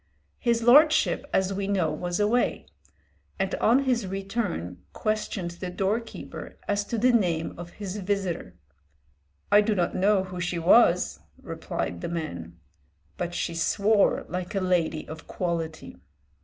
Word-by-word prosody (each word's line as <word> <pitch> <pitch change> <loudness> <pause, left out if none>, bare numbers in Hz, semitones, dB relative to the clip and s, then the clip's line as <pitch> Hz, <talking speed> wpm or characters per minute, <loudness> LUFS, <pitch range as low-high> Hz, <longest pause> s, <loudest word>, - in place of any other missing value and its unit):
His 235 -2 +1
lordship, 290 +1 +5
as 190 +1 +1
we 195 0 -2
know, 185 -6 +1
was 175 +1 -3
away, 220 +4 +1 0.7
and 195 -1 -1
on 250 +5 +4
his 240 -6 0
return 195 - -3
questioned 215 -4 -2
the 175 +1 -6
doorkeeper 205 +5 -4
as 205 0 +1
to 230 - -3
the 250 +3 +4
name 175 -8 +1
of 175 0 -9
his 200 -1 -6
visitor. 195 - -2 1.0
"I 205 - +7
do 210 0 +1
not 175 -3 0
know 195 0 +3
who 185 -1 -6
she 175 0 -1
was," 170 - +4 0.2
replied 85 -1 -4
the - - -3
man, 85 - -5 0.6
"but 175 0 -3
she 170 - -2
swore 200 +5 +2
like 180 +2 -4
a - - +2
lady 175 -4 0
of 160 +1 -9
quality." 165 -3 -4
190 Hz, 140 wpm, -26 LUFS, 170-210 Hz, 1.0 s, I